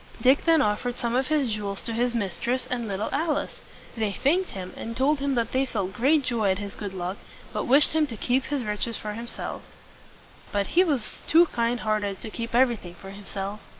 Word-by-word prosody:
Dick 260 +3 +4
then 325 -3 +5
offered 240 +3 -1
some 235 0 -1
of 260 +1 +2
his 285 -7 +1
jewels 200 -2 -3
to 230 - -3
his 240 +1 +1
mistress 235 +4 -1
and 240 -2 -1
little 200 +2 -2
Alice. 305 +2 -1 0.3
They 220 -3 0
thanked 340 - +2
him, 185 -2 -7
and 230 0 -6
told 280 +3 +3
him 275 -1 0
that 230 -2 0
they 260 +1 +2
felt 195 -6 -2
great 275 +7 +3
joy 235 -5 +1
at 190 - +2
his 200 0 -6
good 200 -2 -6
luck, 180 +2 -3 0.4
but - - -1
wished 280 +4 +6
him 315 -1 +3
to 230 -5 -7
keep 255 +5 +1
his 285 -4 -2
riches 210 +2 -2
for 210 -1 -5
himself. 230 +2 -6 0.9
But 200 -1 -1
he 360 - +6
was 285 -11 -2
too 335 +2 +7
kind 240 -4 -1
heart 215 -1 +1
ed 200 -2 -3
to 220 - -7
keep 230 +1 -4
everything 235 -9 +2
for 195 +2 -10
himself. 200 +1 -5
235 Hz, 215 wpm, -26 LUFS, 205-265 Hz, 0.9 s, too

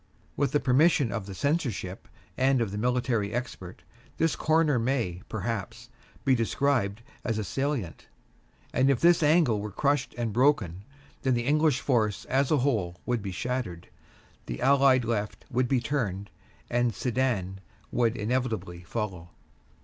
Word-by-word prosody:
With 140 -3 0
the 145 - +3
permission 140 -1 +3
of 110 -4 -4
the 95 - -7
Censorship 125 - -2 0.3
and 130 0 +3
of 115 -4 -1
the 105 - -4
military 120 -3 0
expert, 110 -7 -6 0.3
this 165 -1 +2
corner 155 -4 +2
may, 115 -8 -1
perhaps, 110 +2 -4 0.4
be 135 - +4
described 115 -3 0 0.2
as 115 -2 -1
a 110 - -1
salient, 135 - -3 0.7
and 130 +2 +3
if 135 -4 +3
this 170 0 +5
angle 150 -8 +4
were 105 - -4
crushed 140 +6 0
and 115 -3 -2
broken, 105 - +2 0.4
then 130 -3 +2
the 120 0 -1
English 150 -2 +2
force 110 -7 0
as 135 +1 +1
a 155 - +3
whole 105 -11 0
would 120 -3 0
be 100 -1 -4
shattered, 110 -4 -4 0.6
the - - -4
Allied 135 -2 +4
left 105 -2 -3
would 125 0 +1
be 130 0 +2
turned, 100 -7 -2 0.4
and 120 -2 +1
Sedan 115 -6 -1 0.3
would 120 -1 +1
inevitably 110 -6 -2
follow. 90 -2 -5
120 Hz, 150 wpm, -28 LUFS, 105-135 Hz, 0.7 s, this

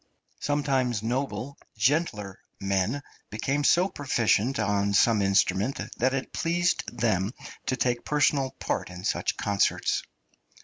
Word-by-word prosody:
Sometimes 135 -6 0
noble 135 +3 -3 0.2
gentler 105 - 0 0.2
men 100 +8 0 0.3
became 135 +7 -1
so 175 +6 +4
proficient 130 - +1
on 100 0 +1
some 105 +1 +4
instrument 95 +4 +2 0.2
that 130 +2 +2
it 135 - -4
pleased 175 +1 +1
them 110 -4 0 0.4
to 130 - +1
take 125 -2 0
personal 145 -2 +2
part - - -2
in 90 0 -9
such 100 - -1
concerts. 100 -1 +1
120 Hz, 120 wpm, -27 LUFS, 100-140 Hz, 0.4 s, so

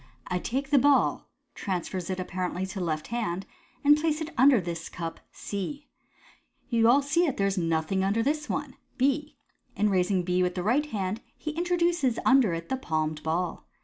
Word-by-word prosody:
I 180 0 -1
take 270 +7 -3
the 285 - +6
ball 285 +1 +3
" - - -49
(transfers 185 -1 -3
it 185 0 -2
apparently 185 0 -3
to 190 +1 -6
left 155 -3 -2
hand) 200 -6 -2 0.4
"and 290 +1 +7
place 305 0 0
it 315 0 -4
under 260 0 +6
this 170 -2 -5
cup 165 -2 -6
(C). 280 +9 -5 0.8
You 230 -1 +4
all 275 +4 +5
see 335 +5 +2
that 280 - -2
there 195 - +2
is 195 -1 +1
nothing 165 +1 0
under 205 +4 +1
this 300 +3 -1
one - - -3
" - - -40
(B). 290 +2 -2 0.4
In 210 0 +2
raising 185 0 +2
B 180 +1 +1
with 180 0 0
the 180 - -2
right 265 +9 +2
hand 205 -3 -3 0.2
he 310 - -4
introduces 340 -5 +1
under 260 -7 +5
it 165 0 -7
the 265 - 0
palmed 155 -8 -2
ball. 170 +3 -2
205 Hz, 190 wpm, -27 LUFS, 180-280 Hz, 0.8 s, and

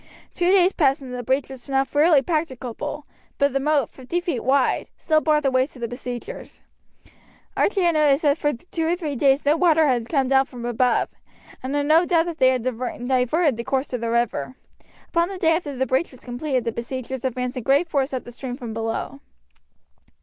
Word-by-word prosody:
Two 350 0 +1
days 375 -1 +5
passed, 275 -3 +2
and 255 -1 -8
the 250 - -4
breach 260 +3 0
was 265 0 -11
now 270 0 +2
fairly 295 +1 +3
practicable, 295 -2 -3 0.3
but 280 -1 +2
the 275 - +1
moat, 285 -3 +1
fifty 265 +7 -3
feet 340 -9 -3
wide, 265 0 +1
still 310 -1 +2
barred 305 -1 +2
the 270 - +2
way 260 0 +2
to 285 - -17
the 235 -1 -3
besiegers. 245 0 -7 0.9
Archie 400 -1 +1
had 340 -1 +3
noticed 300 -1 +3
that 285 -2 +4
for 295 - +1
two 320 +5 -4
or 340 - +2
three 310 -5 -4
days 270 +2 +2
no 295 +2 +4
water 325 -2 +4
had 245 -4 0
come 275 -4 +1
down 270 0 +4
from 240 -2 -8
above, 240 +1 +1 0.5
and 265 +2 -3
had 290 0 +1
no 315 +3 +5
doubt 335 -2 +2
that 340 -2 -6
they 260 -1 +6
had 255 -3 0
diverted 255 +3 0
the 235 - -4
course 265 +2 -2
of 245 - -2
the 230 - -2
river. 235 - -1 0.5
Upon 340 +1 +1
the 390 - -6
day 325 -2 +3
after 295 -5 -4
the 260 +1 0
breach 260 +7 0
was 255 - -16
completed 255 +1 -2
the 230 - -1
besiegers 255 +2 -5
advanced 250 0 -2
in - - -2
great 280 +8 +2
force 280 -3 0
up 260 -2 -3
the 240 - -10
stream 245 0 -6
from 235 -4 -6
below. 225 +4 -4
270 Hz, 210 wpm, -23 LUFS, 250-310 Hz, 0.9 s, they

